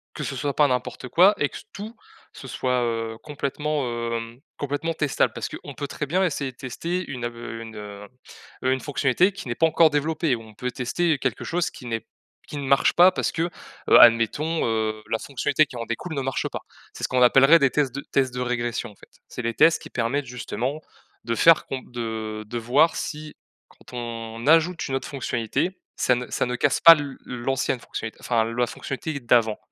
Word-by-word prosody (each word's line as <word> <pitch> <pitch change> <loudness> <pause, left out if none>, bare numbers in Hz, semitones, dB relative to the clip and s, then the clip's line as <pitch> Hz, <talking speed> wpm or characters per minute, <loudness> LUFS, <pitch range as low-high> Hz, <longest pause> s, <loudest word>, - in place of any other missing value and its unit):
que - - -5
ce - - -4
soit 145 -2 -2
pas 150 -2 +4
n'importe 125 0 -3
quoi 185 +9 +6
et 145 - +1
que - - -9
tout 215 +3 -8 0.4
ce 135 - -11
soit, 125 0 0
heu, 115 -1 -2
complètement, 150 0 -2 0.3
hem, 115 +1 -5 0.2
complètement 145 +4 -2
testable, 145 -3 +1
parce - - -4
qu'on - - -9
peut 145 - -4
très 150 - -4
bien 185 +6 +1
essayer 140 -5 -1
de 120 - -34
tester 170 +8 -4
une 125 -4 -5
ave 120 0 -4
une, 115 -1 -8
heu 105 -1 -9 0.6
heu, 130 - +3
une 130 - 0
fonctionnalité 145 +6 +2
qui 195 -9 -8
n'est 120 - -1
pas 165 - +4
encore 160 0 +5
développée, 150 0 0
ou 115 - -10
on 110 -1 -15
peut 125 +3 -4
tester 145 +6 0
quelque 130 -5 -2
chose 175 +1 -1
qui 125 - -12
n'est 115 -1 -4 0.4
qui 145 - -6
ne 140 - -4
marche 140 +1 +4
pas, 180 +2 +7
parce - - -1
que, 165 - -1 0.5
heu, - - +8
admettons, 120 +8 +4
heu, 110 -1 -1
la 115 - +1
fonctionnalité 140 +4 +1
qui 130 - -11
en 115 -1 -5
découle 160 +9 -4
ne 140 - -1
marche 135 0 -2
pas. - - -5 0.3
C'est - - -11
ce - - 0
qu'on 125 -1 +2
appellerait 135 +6 +7
des 140 - +4
tests 135 -3 0
de 140 - -4
tests 130 -2 +1
de 125 - -3
régression, 120 -2 -2
en 105 - -18
fait. - - -18 0.2
C'est - - -7
les 115 0 -2
tests 160 +8 +5
qui - - -9
permettent, 130 +4 -1
justement, 125 +3 -4 0.4
de 115 - -1
faire 165 -1 +5
com 135 -1 -4
de 110 -2 -4
de 120 +3 -4
voir 135 +8 +3
si, 150 0 -5 0.3
quand 125 - -14
on 115 0 -6
ajoute 165 +3 +3
une 135 - -1
autre - - -5
fonctionnalité, 135 - -2 0.2
ça 125 - +3
ne 125 0 -5
ça - - 0
ne 125 0 -2
casse 140 +3 +1
pas 165 - +11
l 145 -3 -5
l'ancienne 125 0 -2
fonctionnalité, 110 -2 -7
enfin, 115 -2 +1
la 115 +2 0
fonctionnalité 140 +5 -5
d'avant. 115 -3 +2
130 Hz, 210 wpm, -24 LUFS, 115-150 Hz, 0.6 s, pas